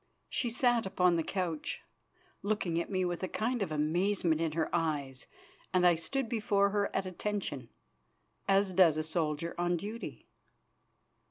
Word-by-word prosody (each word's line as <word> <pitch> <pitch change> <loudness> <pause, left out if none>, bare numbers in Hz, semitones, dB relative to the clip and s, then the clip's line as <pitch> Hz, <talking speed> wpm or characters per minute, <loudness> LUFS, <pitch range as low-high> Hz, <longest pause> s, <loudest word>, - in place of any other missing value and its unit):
She 240 - 0
sat 240 -2 +2
upon 180 -2 +3
the 165 - +2
couch, 170 -4 -3 0.6
looking 190 -5 0
at - - -6
me 185 -2 0
with 175 -1 -2
a 185 - -1
kind 235 +5 -1
of 185 -5 -1
amazement 165 +2 +1
in 160 -2 0
her 160 0 0
eyes, 145 -5 -1 0.4
and 180 -1 +3
I 175 - +7
stood 255 +10 -2
before 205 -3 +2
her 205 0 +1
at 195 - -1
attention, 185 - -3 0.8
as 195 -1 +3
does 170 -4 +5
a 155 - 0
soldier 160 0 -1
on 175 0 +1
duty. 215 +6 -6
180 Hz, 155 wpm, -32 LUFS, 165-205 Hz, 0.8 s, I